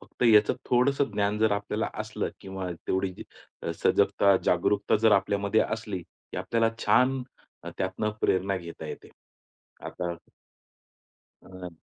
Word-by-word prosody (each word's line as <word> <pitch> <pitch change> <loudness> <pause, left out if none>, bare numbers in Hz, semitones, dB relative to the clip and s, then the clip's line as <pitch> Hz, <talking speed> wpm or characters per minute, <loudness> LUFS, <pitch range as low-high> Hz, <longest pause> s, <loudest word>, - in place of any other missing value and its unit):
फक्त - - -9
याचं 110 -2 +5 0.2
थोडंसं 135 +3 +3
ज्ञान 105 0 0
जर 110 -1 +3
आपल्याला 100 0 -2
असलं - - -3
किंवा 95 -1 -5 0.2
तेवढी 95 -1 -1 0.5
अ, 85 - -2
सजगता, 100 -1 +4
जागरूकता 100 +4 +2
जर 110 0 +4
आपल्यामध्ये 100 +2 +2
असली 105 -4 -2
की - - -15
आपल्याला 115 -1 +1 0.2
छान 125 +5 +3 0.4
अ, 85 - -7
त्यातनं 95 +3 -1
प्रेरणा 95 +1 +1
घेता 85 -2 -8
येते. - - -8 0.8
आता 85 -1 -4 1.3
अ 95 -1 -9
100 Hz, 125 wpm, -27 LUFS, 95-110 Hz, 1.3 s, याचं